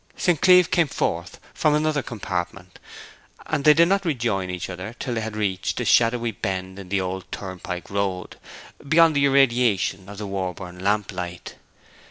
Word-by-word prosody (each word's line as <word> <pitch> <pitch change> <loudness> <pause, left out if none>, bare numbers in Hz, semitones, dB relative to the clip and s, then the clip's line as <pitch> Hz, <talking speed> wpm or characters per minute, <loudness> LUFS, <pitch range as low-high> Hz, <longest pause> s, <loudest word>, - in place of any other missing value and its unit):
St. 175 -5 +1
Cleeve 180 -2 +6
came 170 -3 +3
forth 85 -9 -3
from 150 -1 +2
another 150 -1 +1
compartment, 90 -6 -5 0.7
and 150 -2 -2
they 150 0 +7
did 170 +2 +5
not 195 +1 +1
rejoin 115 - -1
each 90 -1 -4
other 95 +5 -7
till 125 - -4
they 115 - -2
had 110 -1 -5
reached 100 -3 -2
a - - -2
shadowy 115 0 +3
bend 95 -1 -4
in 95 -2 -10
the 100 0 +1
old 95 0 -5
turnpike 90 -3 -6
road, 100 -2 -3 0.5
beyond 165 0 +5
the 140 0 +3
irradiation 120 -8 +2
of 105 - -9
the 105 - -5
Warborne 90 -2 -5
lamplight. 95 -3 -2
100 Hz, 165 wpm, -23 LUFS, 95-140 Hz, 0.7 s, they